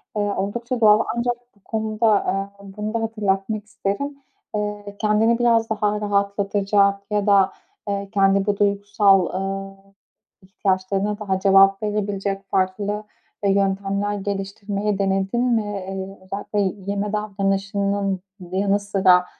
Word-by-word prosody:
eee, 210 - 0 0.2
oldukça 235 +5 -2
doğal. 210 -1 +7 0.2
Ancak 240 +1 +1 0.2
bu - - -27
konuda, 220 0 -1
aaa, 195 -1 +1
bunu 210 +2 -5
da 230 - 0
hatırlatmak 210 -1 -1
isterim. 210 +8 -3 0.4
Eee, 210 -1 -4
kendini 220 +2 +3
biraz 230 -2 +3
daha 210 -1 0
rahatlatacak 200 0 +1
ya 205 -1 +1
da, 195 -2 +5 0.4
eee, 200 -1 -2
kendi 195 -1 +3
bu 205 -1 0
duygusal, 200 -1 +3
aaa, 195 +1 -4 0.7
ihtiyaçlarına 195 +1 -1
daha 190 -3 -1
cevap 195 +1 +5
verebilecek 200 -2 -2
farklı, 200 +2 0 0.4
e, 200 - +3
yöntemler 200 +1 0
geliştirmeyi 200 +1 -3
denedin 195 +4 +1
mi? 235 -3 +2
Eee, 195 -1 -5
özellikle 200 +2 -4 0.3
yeme 200 +1 -2
davranışının 200 -1 -1 0.3
yanı 200 +2 +2
sıra, 190 -3 +4
200 Hz, 120 wpm, -22 LUFS, 195-210 Hz, 0.7 s, doğal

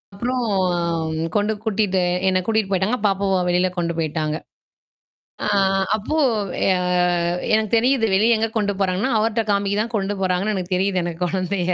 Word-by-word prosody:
அப்புறம் 245 +3 -2 0.9
கொண்டு 210 +1 +1
கூட்டிட்டு 200 -4 +1 0.3
என்ன 185 0 +2
கூட்டிட்டு 220 -3 0
போய்ட்டாங்க, 195 +7 +1
பாப்பாவ 195 -1 +1
வெளியில 180 +1 +2
கொண்டு 170 -1 -1
போய்ட்டாங்க. 155 -1 -1 1.1
அ, - - -1 0.5
அப்போ 260 +9 -3 0.6
அ, - - 0 0.8
எனக்கு 215 -1 0
தெரியுது. 250 -1 +2
வெளிய 225 +3 +4
எங்க 225 +1 0
கொண்டு 205 -1 0
போறாங்கன்னா, 195 +7 0
அவர்ட்ட 225 +1 +1
காமிக்கி 200 0 0
தான் 230 +1 -7
கொண்டு 200 0 -1
போறாங்கன்னு 190 +3 0
எனக்கு 185 0 -3
தெரியுது 190 0 +1
எனக்கு 170 0 -5
குழந்தைய. 185 0 -1
200 Hz, 145 wpm, -21 LUFS, 185-220 Hz, 1.1 s, வெளிய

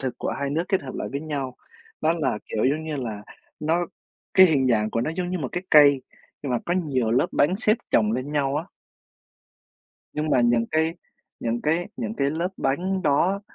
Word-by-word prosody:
thực 130 -2 -4
của - - -2
hai 140 0 -1
nước 160 +4 0
kết 190 -2 +1
hợp 130 - -7
lại - - -4
với 140 - -2
nhau, 140 -5 -4 0.4
đó 155 +1 +3
là, 150 -10 -1
kiểu, 110 - -1
giống 150 +4 +1
như 155 -2 -3
là 110 -6 -4 0.4
nó 165 +3 +1 0.5
cái 190 0 +9
hình 140 -6 +2
dạng 110 -3 +2
của 115 - 0
nó 125 - -1
giống 180 -1 -2
như 185 - -1
một 135 -5 -3
cái 175 - -2
cây, 145 -3 +7 0.4
nhưng 140 -3 -2
mà 120 - +2
có 175 - +1
nhiều 135 -10 0
lớp 130 +7 +3
bánh 155 +6 +3
xếp 215 0 +3
chồng 110 -1 +3
lên 130 +5 -3
nhau 140 -1 +1
á. 155 - -2 1.5
Nhưng 155 +1 -2
mà 130 - +4
những 120 -1 +3
cái 160 +1 +1 0.5
những 115 0 -1
cái 165 +4 0
những 225 -2 -3
cái 140 -4 +1
lớp 165 +4 -1
bánh 185 +8 -1
đó 180 +6 +2
145 Hz, 215 wpm, -24 LUFS, 130-170 Hz, 1.5 s, cái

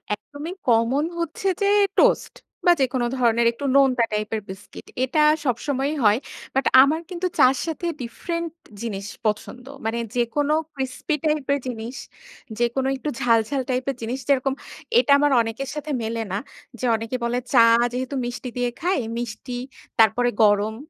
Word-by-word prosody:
একদমই 290 - -8
কমন 240 +5 +3
হচ্ছে 335 +3 -3
যে, 400 - +3 0.3
টোস্ট - - +3 0.3
বা 355 - +7
যেকোনো 255 -1 +1
ধরনের 235 -1 +3
একটু 280 +4 -7
নোনতা 260 -4 +4
টাইপের 215 +1 -2
বিস্কিট। 190 +1 -10 0.2
এটা 300 +4 +2 0.2
সবসময়ই 275 +4 -1
হয়, 210 +3 +5 0.4
বাট 270 0 +1 0.2
আমার 310 +4 +1
কিন্তু 365 0 -2
চা'র 255 +1 +6
সাথে 330 +1 -4 0.2
ডিফরেন্ট 335 +7 -4 0.3
জিনিস 205 -4 -4 0.2
পছন্দ। 220 +4 -2 0.2
মানে 225 +1 -1 0.2
যেকোনো 280 +5 +1 0.2
ক্রিসপি 265 +3 -2
টাইপ 300 -3 +1
এর 285 - 0
জিনিস, 235 +1 -5 0.6
যেকোনো 240 +3 +1
একটু 300 - -4
ঝাল, 230 -2 +4
ঝাল 280 -2 0
টাইপের 255 +1 -1
জিনিস। 245 +4 -3
যেরকম 270 -1 +2 0.5
এটা 295 - +2
আমার 290 0 +3
অনেকের 225 +4 -4
সাথে 300 0 -5
মেলেনা 220 -3 -3 0.4
যে, 255 - -2
অনেকে 225 +3 -4
বলে 235 +1 0 0.2
চা 245 - +7 0.3
যেহেতু 260 +2 -3
মিষ্টি 245 +1 -5
দিয়ে 245 0 +1
খায়, 355 -5 +1 0.2
মিষ্টি, 240 +1 -5 0.4
তারপরে 230 +3 +4
গরম। 210 +1 +3
250 Hz, 150 wpm, -23 LUFS, 230-285 Hz, 0.6 s, বা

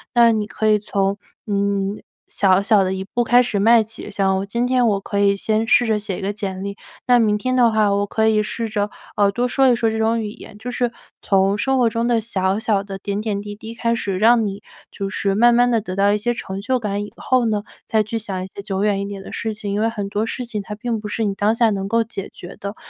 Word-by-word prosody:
那 235 -1 +6
你 215 -1 -1
可 220 - -2
以 215 -1 +4
从， 200 -1 -1 0.3
嗯， 200 0 -1 0.3
小 190 -1 +3
小 200 -1 +4
的 190 0 -1
一 190 - -4
步 240 +4 -1
开 245 +1 +5
始 235 -4 -1
迈 230 +3 +6
起。 220 0 -10
像 195 -1 0
今 235 +4 -1
天 250 -1 +2
我 205 -3 +2
可 200 +1 -4
以 200 0 +4
先 220 +2 0
试 245 - +5
着 220 - +2
写 205 -3 -4
一 - - -7
个 200 +1 -2
简 190 -2 -5
历， 200 0 -4 0.3
那 245 -1 +5
明 210 -2 +2
天 255 +4 -1
的 240 -2 +4
话， 215 -2 +2
我 200 0 +1
可 220 +2 0
以 215 -1 +3
试 230 +2 -3
着， 210 -1 -1 0.3
呃， 200 -1 +3
多 245 +4 0
说 265 +1 +3
一 245 - +4
说 225 -1 +1
这 220 - -2
种 225 +1 +1
语 215 - -4
言。 210 - -13
就 225 +4 -6
是， 245 -1 0 0.3
从 195 +1 +2
生 265 +5 +1
活 245 -2 +3
中 230 +1 -1
的 240 -1 +2
小 195 -3 -1
小 210 -3 +1
的 195 -1 -7
点 200 +1 -3
点 210 -2 -2
滴 205 0 -7
滴 220 +2 -9
开 230 -1 0
始 195 -5 -2
让 225 +2 +4
你， 200 0 -5 0.3
就 200 - -4
是 195 -1 -1
慢 240 +3 +5
慢 245 +1 +4
地 230 - +3
得 185 -3 -6
到 200 +1 +3
一 210 - +2
些 240 +3 0
成 190 -4 -6
就 255 +5 0
感 205 -2 -2
以 - - -13
后 255 -2 +1
呢， 210 -2 0 0.2
再 220 -1 +2
去 220 +2 -4
想 190 -4 -3
一 - - -5
些 195 - -9
久 195 -1 -2
远 205 -2 +1
一 200 - -2
点 200 -1 -7
的 - - -10
事 220 -1 -3
情。 210 -1 -5
因 205 - -1
为 225 +1 +2
很 205 -3 -4
多 210 +2 -1
事 250 +2 -4
情 220 -3 -4
它 210 +1 -7
并 225 +1 -3
不 210 - -6
是 225 +2 -2
你 205 -2 0
当 205 +3 +1
下 230 -1 +3
能 195 -2 -2
够 230 +2 +2
解 200 -3 -6
决 175 - -10
的， 200 +1 -5
210 Hz, 290 characters per minute, -20 LUFS, 200-230 Hz, 0.3 s, 那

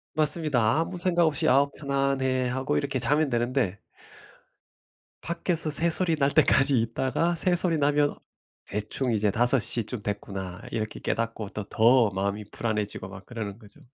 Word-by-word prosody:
맞습니다. 150 -5 +5
아무 165 +2 -3
생각 175 -1 +2
없이 150 -3 0
'아우 140 +2 +4
편안해.' 135 -2 -1
하고 130 +3 -2
이렇게 140 -2 -2
자면 145 +4 +2
되는데 120 -4 -1 1.4
밖에서 170 -1 0
새소리 165 +2 +2
날 140 -1 +1
때까지 135 -4 +3
있다가 130 +9 -1
새소리 175 -1 +1
나면 145 0 +1 0.5
대충 105 +5 -2
이제 105 -1 +1
'5:00 120 0 +1
쯤 120 -3 -5
됐구나.' 95 -1 -5
이렇게 110 -1 -4
깨닫고 115 -3 -3
또 105 - -6
더 115 0 +4
마음이 100 +2 -3
불안해지고 105 -4 -3
막 100 0 -12
그러는 110 -3 -7
거죠. 105 -3 -18
130 Hz, 315 characters per minute, -26 LUFS, 110-150 Hz, 1.4 s, 맞습니다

